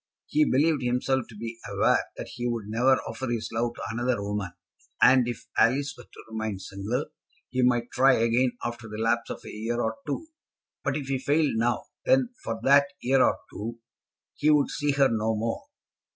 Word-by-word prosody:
He 305 -1 +2
believed 150 +2 +3
himself 125 +1 0
to 110 - -12
be 115 +1 -6
aware - - +2
that - - -6
he 120 - -4
would 115 -3 -2
never 120 +5 +3
offer 115 +4 -5
his 115 -2 -2
love 120 +1 -1
to - - -7
another 120 +1 0
woman; 100 -2 -3 0.5
and 125 -1 +6
if 115 -1 -5
Alice 140 +5 +3
were 125 - -13
to - - -14
remain 110 -2 -3
single, 100 +8 -3 0.5
he 130 - 0
might 120 -1 +2
try 135 +1 +5
again, 115 +2 +2
after 120 -1 -5
the 105 - -6
lapse 115 +1 0
of - - -5
a - - -7
year 115 +3 -3
or 110 -1 -1
two. 145 - -3 0.6
But 135 +2 0
if 145 - -4
he 135 -1 -1
failed 145 +3 +2
now, 120 +2 +1 0.2
then, 260 -2 +3
for - - -3
that 140 +1 +6
year 130 +1 +3
or - - +3
two, 115 +3 -5 0.6
he 150 - +1
would 150 -2 +4
see 145 -1 0
her 140 -1 +5
no 110 -2 0
more. 115 +2 -2
120 Hz, 195 wpm, -27 LUFS, 115-135 Hz, 0.6 s, and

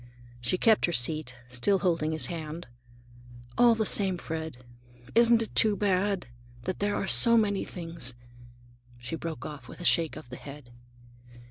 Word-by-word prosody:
She 120 +10 -1
kept 220 0 +3
her - - -2
seat, 135 -1 0
still 125 +11 +2
holding 165 -5 0
his 155 -4 +1
hand. 160 +2 -5 0.9
"All 240 -1 +5
the 220 -1 -1
same, 190 -4 +3
Fred, 160 -7 -6 0.5
isn't 235 0 +5
it - - -9
too 215 -2 +4
bad, 195 -1 0 0.4
that 185 - -4
there 205 0 0
are - - -2
so 235 +4 +6
many 205 -3 +1
things—" 165 -8 -7 0.8
She 120 +6 -6
broke 165 -1 -6
off 145 -5 -9
with - - -12
a 175 - -7
shake 165 -2 +2
of 120 - -11
the 125 - -7
head. 140 -3 -12
170 Hz, 160 wpm, -28 LUFS, 150-205 Hz, 0.9 s, so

